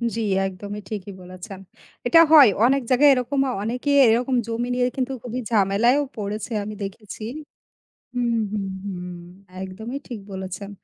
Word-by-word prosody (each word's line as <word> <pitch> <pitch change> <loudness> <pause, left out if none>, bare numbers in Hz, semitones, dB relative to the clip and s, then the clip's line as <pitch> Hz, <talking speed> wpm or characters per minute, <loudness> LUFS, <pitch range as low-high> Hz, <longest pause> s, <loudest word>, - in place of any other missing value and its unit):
জি, 230 - -2 0.3
একদমই 200 +2 -7
ঠিকই 205 -2 -5
বলেছেন। 185 +2 -10 0.5
এটা 330 - +7
হয় 290 -7 +9 0.2
অনেক 275 +2 +3
জায়গায় 275 +3 +6
এরকম 255 +2 -1 0.2
অনেকে 245 +6 -2 0.2
এরকম 245 +3 +2
জমি 230 +1 -2
নিয়ে 250 0 +2
কিন্তু 265 0 -2
খুবই 250 +1 -4
ঝামেলায়ও 225 +7 +3
পড়েছে 210 +3 -4
আমি 215 - -6
দেখেছি 205 +2 -8 0.9
হুম, 240 -2 0
হুম, 200 -2 -2 0.2
হুম 180 -2 -5 0.5
একদমই 220 +8 -6
ঠিক 235 -5 -6
বলেছেন। 190 +1 -6
220 Hz, 140 wpm, -23 LUFS, 200-250 Hz, 0.9 s, হয়